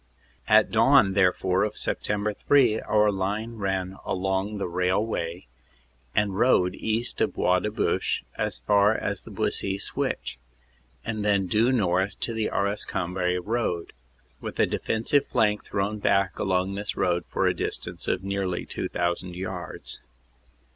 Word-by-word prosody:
"At - - +5
dawn, 95 - +5
therefore, 95 0 +2
of 105 0 -1
Sept. 105 0 -1
3 125 -6 +5
our 105 0 +3
line 105 +4 -3
ran 95 -2 -2
along 95 +2 -1
the 100 - -2
rail 90 +4 +1
way 85 -5 -4 0.7
and 105 -2 +1
road 95 -5 +3
east 110 +4 -2
of - - +1
Bois 90 0 +3
de 105 - -2
Bouche, 105 - 0
as - - -2
far 100 - +4
as 100 -2 -3
the - - -13
Buissy 95 0 -1
Switch, 65 - -3 0.7
and 110 -2 -3
then 100 -2 +2
due 110 +7 +2
north 95 -5 +1
to 115 - -1
the 110 -1 -1
Arras 100 +1 0
Cambrai 90 0 -1
road, 90 -3 -2 0.5
with - - -7
a - - +6
defensive 115 +6 0
flank 105 -1 +1
thrown 100 +2 -2
back 100 -2 +1
along 95 -1 0
this 100 +1 -4
road 90 -1 +1
for - - 0
a - - +3
distance - - -4
of 95 - 0
nearly 95 -2 -2
2,000 85 +1 -2
yards. 90 -1 -5
100 Hz, 145 wpm, -26 LUFS, 90-105 Hz, 0.7 s, a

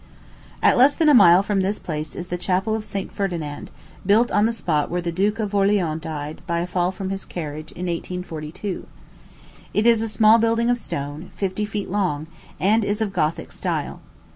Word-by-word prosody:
At - - +5
less 275 +3 +6
than 320 -2 +3
a - - +6
mile 185 -5 +7
from 200 -1 0
this 195 +2 0
place 155 -2 -5
is 180 - -5
the - - 0
Chapel 185 +4 0
of 220 -1 -2
St. 200 -2 -4
Ferdinand, 170 -7 -4 0.3
built 215 +5 +3
on 205 +2 +3
the - - 0
spot 160 -10 -1
where 175 - -1
the 170 -1 -2
Duke 200 +5 0
of 210 -2 -3
Orleans 195 -6 +2
died, 155 -1 -6
by 170 - 0
a - - -1
fall 180 0 0
from 190 0 -5
his 195 0 -3
carriage, 155 -2 -6
in 180 - -5
1842. 175 +1 -5 0.9
It 210 - +2
is 230 -2 +5
a 225 - -2
small 220 +1 +5
building 230 +1 +2
of 245 - 0
stone, 145 -1 -5
fifty 200 +1 -2
feet 205 -3 -4
long, 180 -7 0 0.3
and 215 +4 +3
is 205 +1 -1
of 215 -3 -1
Gothic 160 -3 -1
style. - - -3
190 Hz, 195 wpm, -22 LUFS, 170-210 Hz, 0.9 s, mile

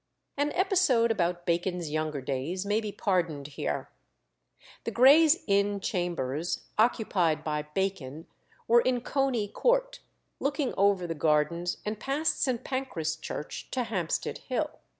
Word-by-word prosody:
An 290 +1 0
episode 355 - +3
about 175 -4 -1
Bacon's 175 -1 -1
younger 155 -2 -2
days 140 +9 -3
may 210 +2 +1
be 210 -2 -4
pardoned 170 -9 -1
here. 145 - -4 0.9
The - - -2
Gray's 300 +6 +6
Inn 200 0 +2
Chambers 175 -5 -2
occupied 185 -9 +2
by 150 -1 -1
Bacon 165 -6 -2 0.4
were 235 +1 +6
in 250 -1 +1
Coney 260 -5 0
Court, - - +1 0.4
looking 280 -2 -1
over 195 -2 +3
the 165 - -2
gardens 160 +3 +1
and 210 0 -3
past 280 +6 -1
St. 250 -4 0
Pancras 255 - -2
Church 155 -1 -6
to 255 - -1
Hampstead 185 -8 -2
Hill. - - -2
195 Hz, 130 wpm, -28 LUFS, 165-250 Hz, 0.9 s, Gray's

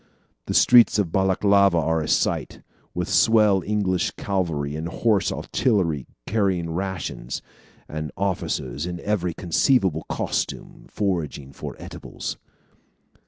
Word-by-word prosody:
The - - -2
streets 120 -3 +6
of 100 -6 0
Balaklava 95 0 +3
are 80 0 +1
a 75 - -3
sight, - - 0 0.3
with 90 -1 -2
swell 105 -4 +4
English 95 -4 0
cavalry 80 -7 -2
and 80 +2 -4
horse 100 +1 +1
artillery 85 - 0 0.2
carrying 95 -6 0
rations, 90 -8 -4 0.4
and 75 0 -5
officers 85 -7 -2
in 90 -1 -5
every 90 -5 -1
conceivable 90 - +1
costume - - -3
foraging 80 -9 -2
for - - -7
eatables." - - -7
90 Hz, 115 wpm, -24 LUFS, 80-100 Hz, 0.4 s, streets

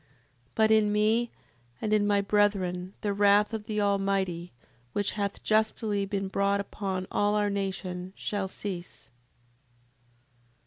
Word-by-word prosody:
7:38. 145 - -35 0.5
But 220 0 +4
in 215 -1 +4
me, 220 +3 +2 0.5
and 215 - -1
in 205 -1 +3
my 205 -1 +3
brethren, 195 -3 +1
the 205 -1 0
wrath 205 +1 +4
of 215 -1 -4
the 215 -1 -1
Almighty, 195 -4 0 0.4
which 205 -1 0
hath 200 -1 -3
justly 215 -2 +1
been 195 -1 -2
brought 200 +1 +1
upon 195 -2 -3
all 205 0 +2
our 205 -1 +1
nation, 190 -2 -3
shall 200 -2 -2
cease. 185 -2 -7
200 Hz, 135 wpm, -28 LUFS, 195-210 Hz, 0.5 s, But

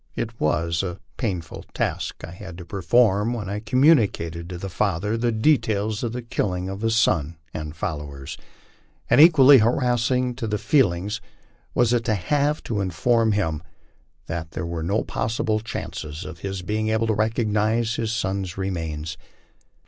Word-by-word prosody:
It 115 0 -4
was 80 +2 +1
a 90 -1 -4 0.2
painful 90 - -3
task - - -2
I 85 - -10
had 90 -1 -9
to 90 - -9
perform 105 +4 +2
when 110 -5 -4
I 100 +2 -3
communicated 110 - +2
to 90 - -5
the 95 +3 -5
father 100 +2 -1
the 120 +1 +1
details 110 -4 +1
of 115 - -1
the 125 +1 -5
killing 95 -6 -2
of 95 +1 -6
his 115 0 +3
on 80 +2 0 0.2
and 75 -1 -5
followers. 75 -4 -5 0.8
And - - +7
equally 145 -5 +8
harassing 125 +2 +1
to 115 - -3
the 105 0 0
feelings 105 - +1 0.5
was 120 -1 +3
it 120 -1 +2
to 110 - +2
have 145 - 0
to 105 -3 -2
inform 110 +5 +2
him 80 -7 -1 0.6
that 80 -1 -5
there 85 - -3
was 85 -1 -4
no 100 +5 +1
possible 110 -1 -1
chance 110 - -5 0.2
of 85 - -8
his 95 0 -4
being 110 +3 -1
able 110 +1 +1
to 110 - +1
recognize 110 +1 +1
bis 110 -1 -1
son's 95 -5 -2
remains. 80 -5 -3
105 Hz, 160 wpm, -24 LUFS, 85-115 Hz, 0.8 s, equally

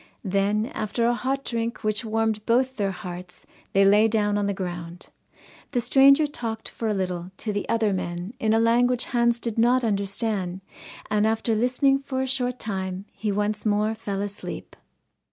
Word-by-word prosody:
Then, 200 +2 +1
after 220 +2 -1
a 240 - +3
hot 265 +3 -2
drink 230 0 -3
which 215 +2 0
warmed 220 -1 0
both 255 +3 +2
their 200 -4 0
hearts, 180 -1 -8 0.3
they 195 0 +5
lay 210 +3 +6
down 210 -2 +1
on 205 -1 0
the - - +1
ground. 175 -1 -6 0.6
The 245 - +2
stranger 275 +5 +5
talked 230 -6 -4
for 225 - -4
a 215 - +1
little 180 -2 -3
to 215 - -3
the 205 - -3
other 225 -3 +2
men 175 +2 -4
in 220 - +1
a 225 - +4
language 240 +2 +3
Hans 235 -1 +1
did 230 -1 -2
not 245 +2 +4
understand, 200 -3 -1 0.5
and 210 0 +3
after 225 +1 0
listening 255 +4 +2
for 265 -1 -3
a - - -1
short 250 -1 0
time 190 -3 -4
he 215 -1 -3
once 210 +1 -1
more 215 0 +1
fell 205 -3 -4
asleep. 205 0 -7
215 Hz, 175 wpm, -25 LUFS, 200-235 Hz, 0.6 s, lay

